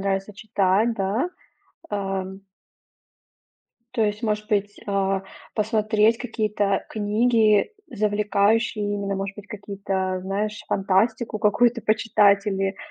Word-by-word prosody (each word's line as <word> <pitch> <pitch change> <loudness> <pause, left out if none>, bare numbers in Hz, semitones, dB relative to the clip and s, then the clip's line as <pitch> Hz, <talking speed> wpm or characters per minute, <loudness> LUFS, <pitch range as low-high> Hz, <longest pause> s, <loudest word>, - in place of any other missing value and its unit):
нравится 195 +1 -2
читать, 205 +2 +1
да. 210 - -1 0.6
Ам. 195 -1 -3 1.5
То 240 -3 +1
есть 210 +2 -2
может 210 -1 -1
быть, 205 -2 -1
а, 195 -1 0 0.3
посмотреть 215 +1 +2
какие-то 210 -4 -1
книги, 215 - +2 0.2
завлекающие 210 +1 +1
именно, 200 -1 -2
может 195 0 -4
быть 205 - -10
какие-то 195 -2 -3
знаешь 205 +3 -3
фантастику, 215 +4 +1
какую-то 235 +3 +3
почитать 205 -2 +3
или, 195 -1 -1
205 Hz, 100 wpm, -24 LUFS, 195-215 Hz, 1.5 s, какую-то